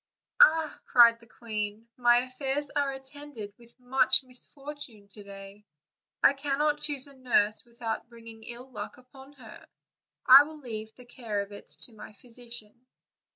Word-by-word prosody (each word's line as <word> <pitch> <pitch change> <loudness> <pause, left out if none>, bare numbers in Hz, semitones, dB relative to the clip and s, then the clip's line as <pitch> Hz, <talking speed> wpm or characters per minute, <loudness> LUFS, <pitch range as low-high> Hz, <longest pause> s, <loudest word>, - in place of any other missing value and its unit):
"Ah!" 320 -6 +5
cried 235 -1 +6
the 230 - -19
queen, 215 -1 -5
"my 240 0 +4
affairs 270 +2 -3
are 285 -1 0
attended 270 -5 -6
with 235 +1 -19
much 260 +2 +3
misfortune 260 -3 -6
to 205 +1 -13
day; 200 +1 -12 0.6
I - - +7
cannot 295 +2 0
choose 290 -3 -1
a 280 -1 -11
nurse 230 -5 +2
with 235 0 -18
out 225 +1 -3
bringing 230 -1 -13
ill 245 +2 -10
luck 210 -1 -7
upon 265 +2 -16
her! 275 - -14 0.6
I 265 +2 +11
will 310 +2 -5
leave 220 -5 -7
the 250 - -15
care 230 -4 -4
of 200 0 -8
it 205 - -12
to 240 - -5
my 215 0 -12
physician." 235 +1 -9
245 Hz, 155 wpm, -28 LUFS, 220-275 Hz, 0.6 s, I